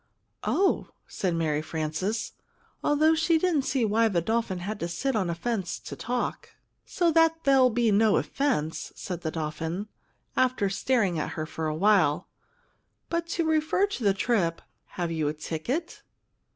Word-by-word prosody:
"Oh!" 390 0 +2 0.2
said 180 -3 -2
Mary 155 -2 0
Frances, 160 +8 -2 0.5
although 305 +2 +4
she 325 +1 +3
didn't 325 -3 +2
see 260 -3 +1
why 225 +2 +3
the 190 -6 +1
dolphin 220 +1 -1
had 200 +4 -5
to 170 - -2
sit 265 +9 -2
on 190 -5 0
a 170 - -1
fence 190 0 -2
to - - -7
talk. 245 0 -3 0.3
"So 345 -2 +2
that 325 0 +3
there'll 270 -2 +5
be 235 -1 +2
no 210 0 +4
offense!" 165 - -1
said 180 -3 -5
the 160 - -2
dolphin, 160 +5 -4 0.5
after 255 -6 +2
staring 195 -6 +1
at - - -3
her 155 - -3
for 160 0 -4
a 155 - -1
while; 180 -5 +3 0.8
"but 335 0 -1
to 335 0 -1
refer 315 +4 +2
to 395 - -5
the 200 -2 +3
trip 195 -7 0 0.2
have 175 -2 -4
you 160 -2 0
a 150 - 0
ticket?" 240 - -4
210 Hz, 165 wpm, -27 LUFS, 165-275 Hz, 0.8 s, there'll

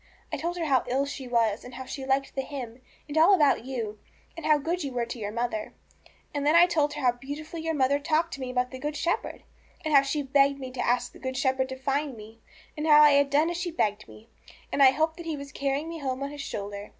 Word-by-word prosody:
I - - 0
told 345 +2 -3
her 335 - -1
how 265 -5 +3
ill 270 +3 +1
she 275 -2 -6
was, 230 -3 +1
and 245 0 -10
how 260 +1 -7
she 265 0 -6
liked 270 0 0
the 270 - -1
hymn, 260 -3 -7 0.3
and 295 - -7
all 365 +5 +7
about 295 -8 +3
you, 225 -5 -4 0.4
and 330 - -5
how 305 -1 +5
good 335 +4 -2
you 275 - -3
were 240 -1 -1
to 235 +1 -7
your 205 -1 -4
mother. 235 -1 -3 0.6
And 285 -1 -2
then 300 +3 +3
I 340 +1 +8
told 305 -4 +1
her - - -5
how 250 -2 +4
beautifully 290 +6 -7
your 325 0 -2
mother 280 0 +2
talked 320 +3 0
to 275 - -6
me 255 - -4
about 250 0 -1
the 260 - -7
Good 295 +2 -3
Shepherd, 335 +4 -2 0.4
and 310 - 0
how 280 - +8
she 285 +2 -2
begged 275 +1 +3
me 260 -1 -6
to 255 -1 -3
ask 245 +1 +1
the - - -15
Good 260 -1 -4
Shepherd 260 0 +1
to 260 - -5
find 275 0 -2
me, 220 +2 -12 0.4
and 300 +1 -3
how 300 -1 +8
I 300 -1 +8
had 280 0 +4
done 300 +4 +3
as 345 - -3
she 355 0 -2
begged 215 -10 -1
me, 220 - -15 0.4
and - - 0
I 270 - +9
hoped 315 +4 0
that 340 -1 -8
He 315 -2 -2
was 280 0 -8
carrying 280 +3 -2
me 330 0 -6
home 265 -1 -3
on 280 - -4
His 290 -1 -7
shoulder. 205 -4 -6
275 Hz, 265 wpm, -27 LUFS, 250-300 Hz, 0.6 s, I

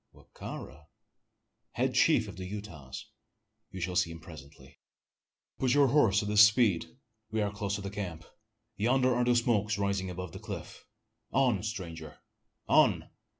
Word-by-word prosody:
"Wa - - -18
ka - - -7
ra?" 75 +4 -10 0.9
"Head - - 0
chief - - +4
of - - -8
the 95 0 -6
Utahs 90 -10 -8 0.6
you 95 - -8
shall 90 +1 -3
see 90 -1 +2
him 85 0 -8
presently. 75 -5 -14 0.8
Put 130 0 +2
your 140 -2 +5
horse 115 -7 +4
to - - -4
his 105 0 +5
speed! 105 -5 +4 0.3
We 110 - -2
are 105 -1 0
close 100 -1 -2
to 100 - -5
the 100 0 -5
camp. 90 -6 -6 0.5
Yonder 125 +4 +3
are 120 0 +1
the 120 0 +3
smokes 110 -3 +1
rising 100 -2 -1
above 90 -1 -6
the - - -9
cliff! - - -8 0.5
On 125 -7 +2
stranger! 85 -8 -6 0.5
on!" - - +3
100 Hz, 160 wpm, -30 LUFS, 85-110 Hz, 0.9 s, your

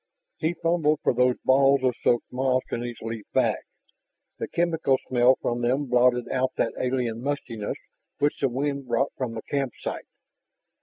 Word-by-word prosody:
He 165 +2 0
fumbled 165 -3 +1
for - - +3
those 125 0 +3
balls 135 +1 +4
of 130 -1 +3
soaked 120 0 +1
moss 130 0 +1
in 120 - -2
his 120 -1 -5
leaf 115 -1 -5
bag. - - +2 0.8
The - - -3
chemical 165 -6 +1
smell 125 +1 +4
from 120 0 -1
them 130 +4 +1
blotted 125 -1 +3
out 130 0 0
that - - 0
alien 125 -3 -1
mustiness 125 -6 -3 0.4
which 145 +1 0
the 135 - +2
wind 140 +1 -2
brought 120 +4 +1
from 125 -3 -3
the 110 - -6
campsite. 135 -4 -3
130 Hz, 160 wpm, -26 LUFS, 120-140 Hz, 0.8 s, balls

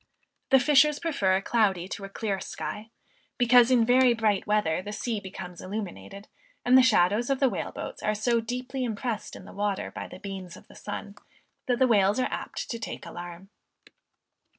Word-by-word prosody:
The 270 - +6
fishers 300 +2 +4
prefer 240 - +1
a 195 - -1
cloudy 195 -7 +1
to 200 - -6
a - - -9
clear 195 -1 -3
sky; 215 +3 -6 0.5
because 245 -1 +6
in 245 -3 +4
very 250 0 +5
bright 215 -3 0
weather, 210 -6 +1
the 205 +2 -7
sea 220 +1 -3
becomes 185 -2 -9
illuminated, 195 - -7 0.4
and 250 +1 +5
the 260 - +9
shadows 215 -1 +3
of 270 -1 +1
the 270 - +4
whale - - -4
boats - - -7
are 215 - 0
so 235 +2 +1
deeply 250 +3 -4
impressed 230 -1 -3
in - - -11
the - - -12
water 205 -1 -2
by - - -6
the - - -10
beams 190 -2 -8
of - - -17
the - - -17
sun 205 0 -7 0.5
that 245 -1 +2
the 260 - +4
whales 205 -2 +3
are 255 - 0
apt - - -5
to 230 - -4
take 225 - -6
the - - -9
alarm. 175 +3 -9
215 Hz, 195 wpm, -27 LUFS, 195-245 Hz, 0.5 s, the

